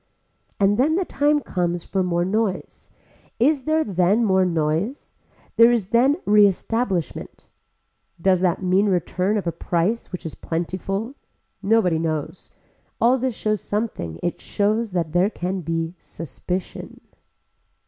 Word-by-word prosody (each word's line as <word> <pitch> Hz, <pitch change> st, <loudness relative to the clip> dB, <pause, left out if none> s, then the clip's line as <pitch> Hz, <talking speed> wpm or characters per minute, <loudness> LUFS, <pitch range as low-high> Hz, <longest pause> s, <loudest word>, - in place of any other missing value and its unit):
And 205 Hz, +2 st, +3 dB
then 305 Hz, +5 st, +3 dB
the 375 Hz, +1 st, 0 dB
time 295 Hz, -1 st, +1 dB
comes 175 Hz, -5 st, -2 dB
for 190 Hz, -, -1 dB
more 175 Hz, -1 st, 0 dB
noise. 200 Hz, 0 st, -2 dB, 0.5 s
Is 270 Hz, +2 st, +2 dB
there 315 Hz, 0 st, +2 dB
then 195 Hz, -, +2 dB
more 190 Hz, -2 st, +3 dB
noise. 165 Hz, -, -1 dB, 0.4 s
There 230 Hz, +1 st, +8 dB
is 220 Hz, -6 st, 0 dB
then 260 Hz, +6 st, +3 dB
reestablishment. 205 Hz, -2 st, +1 dB, 0.7 s
Does 185 Hz, +1 st, +3 dB
that 180 Hz, 0 st, 0 dB
mean 185 Hz, +3 st, +3 dB
return 185 Hz, +2 st, 0 dB
of 200 Hz, -, -3 dB
a 170 Hz, -, 0 dB
price 175 Hz, +7 st, -1 dB
which 180 Hz, -, -7 dB
is 160 Hz, -, -5 dB
plentiful. 190 Hz, +7 st, -3 dB, 0.5 s
Nobody 195 Hz, -5 st, +2 dB
knows. 160 Hz, +1 st, -4 dB, 0.5 s
All 250 Hz, +3 st, +4 dB
this 255 Hz, -2 st, -1 dB
shows 215 Hz, -1 st, -1 dB
something 205 Hz, -, -3 dB
it 175 Hz, -, -2 dB
shows 215 Hz, +3 st, 0 dB
that 170 Hz, -4 st, -1 dB
there 180 Hz, +4 st, +3 dB
can 185 Hz, -2 st, -3 dB
be 165 Hz, 0 st, -2 dB
suspicion. 175 Hz, +4 st, -6 dB
190 Hz, 135 wpm, -22 LUFS, 175-225 Hz, 0.7 s, There